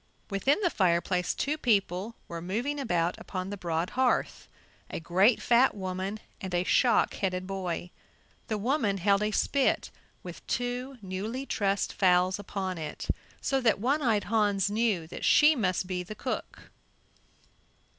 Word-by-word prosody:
Within 265 - +2
the 355 -4 +2
fireplace 180 -1 +1
two 300 +2 -1
people 205 - 0
were 170 -1 -6
moving 235 +12 -2
about 175 -9 0
upon 185 +1 -5
the - - -3
broad 170 -2 -2
hearth, 255 -1 0 0.4
a - - -4
great, 190 +8 +3
fat 245 +1 +4
woman 190 +2 -4 0.2
and 185 -2 -3
a 175 - +2
shock 235 +4 +3
headed 185 -2 -2
boy. 185 -2 -4 0.6
The 215 - -1
woman 220 -2 0
held 200 +2 +2
a 210 - +1
spit 270 +5 +1 0.3
with - - -10
two 250 +2 -2
newly 210 +8 -4
trussed 200 -5 0
fowls 185 0 +3
upon 190 -3 -4
it, 155 - -6 0.3
so 270 -1 0
that 230 -4 +3
One 275 +8 +1
eyed 220 -6 +2
Hans 205 -2 +1
knew 210 -6 +1
that 160 - -8
she 305 +1 +6
must 185 -7 0
be 180 -1 -3
the 180 +4 -8
cook. - - -5
200 Hz, 150 wpm, -29 LUFS, 185-235 Hz, 0.6 s, she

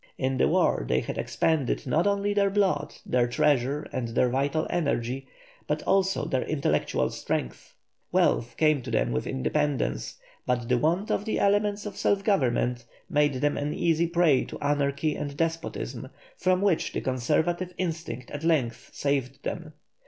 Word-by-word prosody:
In 130 -1 0
the - - +4
war - - +2
they 65 - +3
had - - -5
expended 155 -4 0
not 155 +8 +2
only 200 0 +1
their 200 -1 +3
blood, 195 -7 +1
their 125 -1 +2
treasure, 135 +3 +1
and 125 -2 -2
their 120 +2 +2
vital 140 +5 0
energy, 135 -6 -1 0.4
but - - -1
also 195 0 +2
their 130 - 0
intellectual 150 -3 0
strength. 60 - -4 0.4
Wealth 120 0 +2
came 155 -3 +3
to 120 - -7
them 115 - +1
with 65 - -2
independence, 145 - -1 0.3
but 125 -1 0
the 125 0 +2
want 175 - +1
of 205 - 0
the 220 - -1
elements 205 +1 +2
of 205 -2 -6
self 200 -1 +1
government 125 - +1 0.3
made 145 -1 +3
them 145 +3 0
an 145 +1 -2
easy 170 0 +2
prey 170 -5 +3
to - - -8
anarchy 145 +1 0
and 145 -1 -5
despotism, 160 -6 -3 0.3
from 185 +1 +1
which 190 -5 +1
the - - -2
conservative 155 +8 0
instinct 160 -8 -4
at 145 +1 -6
length 130 -7 0
saved 140 -1 -1
them. 155 -2 -5
145 Hz, 160 wpm, -27 LUFS, 130-170 Hz, 0.4 s, the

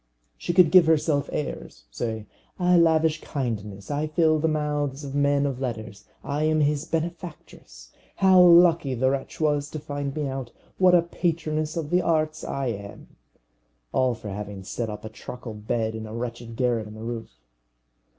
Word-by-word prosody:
She 115 - -3
could 175 -2 +5
give 180 -3 +7
herself 150 -2 +2
airs: 140 - -5
say, 110 - -4 0.3
"I 180 -1 +3
lavish 160 -2 +3
kindness; 105 -6 -4
I 145 +2 -1
fill 155 0 +2
the 160 - +1
mouths 150 -2 -1
of 135 -1 -6
men 145 0 +2
of 135 -3 -2
letters; 110 -5 -5 0.2
I 145 +2 -1
am 155 0 +2
his 150 +1 +1
benefactress. 165 - -6 0.2
How 190 -1 +6
lucky 170 -5 +6
the 130 +2 +2
wretch 135 -1 -4
was 145 -2 +1
to 155 - -6
find 145 -1 -4
me 150 -2 -1
out! 130 -3 -5 0.3
What 185 -1 +6
a 170 - +5
patroness 160 -2 -2
of 155 -3 -3
the 180 +1 +4
arts 155 -2 0
I 140 -1 -3
am!" 100 -2 -7 0.8
All 130 -2 +2
for 110 -1 -8
having 100 -1 -6
set 110 +3 -4
up 105 +1 -7
a - - -5
truckle 120 +1 -8
bed 110 +1 -2
in 110 0 -6
a 110 - -7
wretched 115 -1 -5
garret 120 -3 0
in 105 - -10
the 110 - -9
roof. 115 - -5
145 Hz, 175 wpm, -25 LUFS, 115-155 Hz, 0.8 s, give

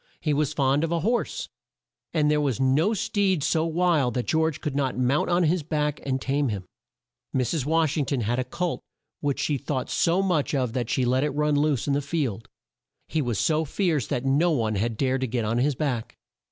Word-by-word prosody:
He 150 - 0
was 145 -1 +1
fond 140 +2 +2
of 165 - -1
a 170 -1 0
horse, 240 - -1 0.6
and 150 -2 +2
there 150 0 +2
was 135 -5 0
no 145 +11 +2
steed 200 -6 +1
so 160 +1 +1
wild 165 -6 +1
that 125 - -1
George 160 -2 +1
could 145 -3 -4
not 135 -3 0
mount 130 +6 +1
on 175 0 +3
his 170 +2 +2
back 150 -1 -1
and 135 -1 -1
tame 140 +1 0
him. 100 -4 -4 0.7
Mrs. 130 +2 0
Wash 160 -2 +2
ing 145 - +1
ton 135 -3 -1
had 120 +3 0
a - - +1
colt 170 +7 -3 0.4
which 145 -2 -1
she 145 -3 0
thought 135 -1 -3
so 175 +3 +2
much 165 -6 +1
of 125 -4 0
that 120 -3 -2
she 130 - +1
let 130 +2 +2
it 150 - +1
run 150 0 +1
loose 145 -3 +1
in 140 - 0
the 145 - +1
field. 140 - -3 0.6
He 160 - 0
was 120 -6 -1
so 155 +6 +2
fierce 160 - 0
that 125 +1 -2
no 145 +6 +3
one 115 -9 +1
had 110 +2 -1
dared 130 +1 0
to 130 - 0
get 115 -1 -1
on 115 +3 0
his 140 +2 +1
back. 125 -5 -3
145 Hz, 220 wpm, -25 LUFS, 130-160 Hz, 0.7 s, on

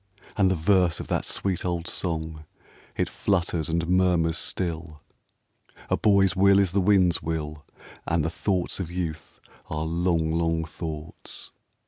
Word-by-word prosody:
And 100 -3 +3
the 95 - +2
verse 90 0 +2
of - - -7
that - - 0
sweet 95 -3 -1
old 85 -2 -2
song, 80 -3 -3 0.5
It - - +1
flutters 85 -5 -1
and 85 0 0
murmurs 90 -3 +2
still: 80 -3 -3 0.9
"A - - +5
boy's 100 -3 +3
will 100 +1 +5
is 100 -3 +3
the 100 +1 +2
wind's 90 -3 +4
will, 75 -1 -4 0.4
And 85 -3 +1
the 80 - -1
thoughts 90 +1 -1
of 90 -4 -3
youth 80 -4 -5 0.3
are 75 0 -2
long, 85 -1 +1
long 80 0 0
thoughts." 80 0 -8
85 Hz, 145 wpm, -26 LUFS, 80-95 Hz, 0.9 s, A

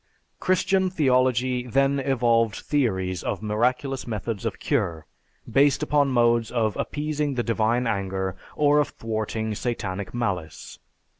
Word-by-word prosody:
Christian 185 0 +2
theology 130 -5 +1
then 135 +3 +2
evolved 115 -5 +2
theories 95 - -1
of - - -3
miraculous 125 +5 0
methods 110 -1 -3
of 105 - -4
cure, 85 - -1 0.4
based 140 0 +3
upon 145 -1 +2
modes 120 -3 +2
of 110 -3 0
appeasing 150 -1 -2
the 120 - 0
divine 115 +2 +1
anger, 95 -3 -2 0.2
or 150 0 +4
of 150 - +2
thwarting 110 0 -3
satanic 100 -4 -3
malice. 95 -10 -4
120 Hz, 125 wpm, -25 LUFS, 110-135 Hz, 0.4 s, or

